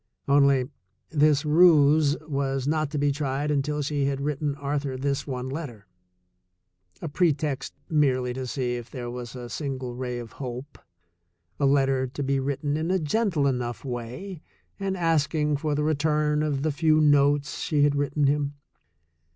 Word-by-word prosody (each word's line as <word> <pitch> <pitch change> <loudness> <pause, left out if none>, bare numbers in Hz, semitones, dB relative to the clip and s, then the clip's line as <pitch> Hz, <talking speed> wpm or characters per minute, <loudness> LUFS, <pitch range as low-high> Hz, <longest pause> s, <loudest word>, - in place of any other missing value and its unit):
Only, 140 -2 +4 0.4
this 150 -1 +3
ruse 150 -2 +5
was 135 -3 -2
not 155 -1 0
to 150 - -4
be 145 0 +2
tried 140 0 -2
until 150 +1 0
she 145 0 -1
had 140 -1 -1
written 145 0 -2
Arthur 140 -2 -3
this 140 +2 -2
one 130 -2 -4
letter 130 -7 -6 0.6
— 90 0 -40
a - - -2
pretext 145 -4 0
merely 130 -5 +1
to 130 0 -5
see 125 -1 -2
if 120 -1 -9
there 120 -2 -6
was 125 0 -7
a 125 -1 -7
single 130 -2 -4
ray 125 0 -4
of 120 -2 -7
hope, 130 +2 -7 0.8
a 140 - +3
let 135 0 +4
ter 130 -1 0
to 140 +3 -5
be 135 0 +1
written 140 +2 -1
in 160 +2 -2
a 190 - +2
gentle 170 -2 0
enough 125 -2 -2
way 130 +9 -6 0.4
and 195 -1 -2
asking 150 -3 +1
for 150 0 -1
the 150 - 0
return 150 0 +1
of 145 -3 -1
the 155 - +1
few 155 +1 +3
notes 145 -1 +3
she 150 -2 +1
had 145 0 +3
written 145 +1 0
him. 145 0 +1
140 Hz, 165 wpm, -26 LUFS, 130-150 Hz, 0.8 s, ruse